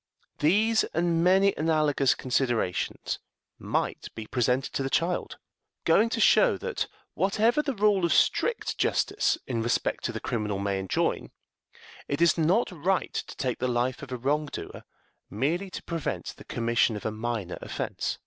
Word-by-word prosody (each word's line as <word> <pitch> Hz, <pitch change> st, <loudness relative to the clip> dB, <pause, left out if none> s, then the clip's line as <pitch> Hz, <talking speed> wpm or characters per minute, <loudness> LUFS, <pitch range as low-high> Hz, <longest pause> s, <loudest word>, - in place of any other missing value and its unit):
These 215 Hz, +9 st, +3 dB
and 170 Hz, 0 st, +2 dB
many 190 Hz, +2 st, +4 dB
analogous 155 Hz, -4 st, +2 dB
considerations 120 Hz, -7 st, -1 dB, 0.4 s
might -, -, -2 dB
be 110 Hz, -, -6 dB
presented 125 Hz, +3 st, 0 dB
to -, -, -1 dB
the 135 Hz, -, -1 dB
child, 170 Hz, +5 st, -1 dB, 0.5 s
going 230 Hz, -, +4 dB
to 230 Hz, -, -2 dB
show -, -, +5 dB
that, 475 Hz, -, -3 dB, 0.3 s
whatever 220 Hz, +8 st, +2 dB
the 280 Hz, -4 st, -3 dB
rule 205 Hz, -2 st, +3 dB
of 170 Hz, -, +2 dB
strict 475 Hz, -, +1 dB
justice -, -, +1 dB
in 120 Hz, -3 st, -2 dB
respect 120 Hz, +1 st, 0 dB
to -, -, 0 dB
the -, -, -5 dB
criminal 105 Hz, -3 st, -2 dB
may 100 Hz, 0 st, -1 dB
enjoin, 95 Hz, -1 st, -1 dB, 0.8 s
it 140 Hz, -, -2 dB
is 170 Hz, -2 st, +5 dB
not 180 Hz, +8 st, +2 dB
right 180 Hz, +3 st, -1 dB
to -, -, -5 dB
take 125 Hz, -2 st, -2 dB
the 130 Hz, -, 0 dB
life 125 Hz, +1 st, 0 dB
of 140 Hz, -2 st, -9 dB
a 125 Hz, -, -2 dB
wrong 145 Hz, +5 st, 0 dB
doer -, -, -8 dB, 0.4 s
merely 165 Hz, -, -1 dB
to -, -, -7 dB
prevent 165 Hz, -3 st, -4 dB
the -, -, -14 dB
commission 115 Hz, -1 st, +1 dB
of 105 Hz, -, -7 dB
a 110 Hz, -, 0 dB
minor 110 Hz, -4 st, -4 dB
offense. -, -, -3 dB
150 Hz, 160 wpm, -27 LUFS, 120-185 Hz, 0.8 s, show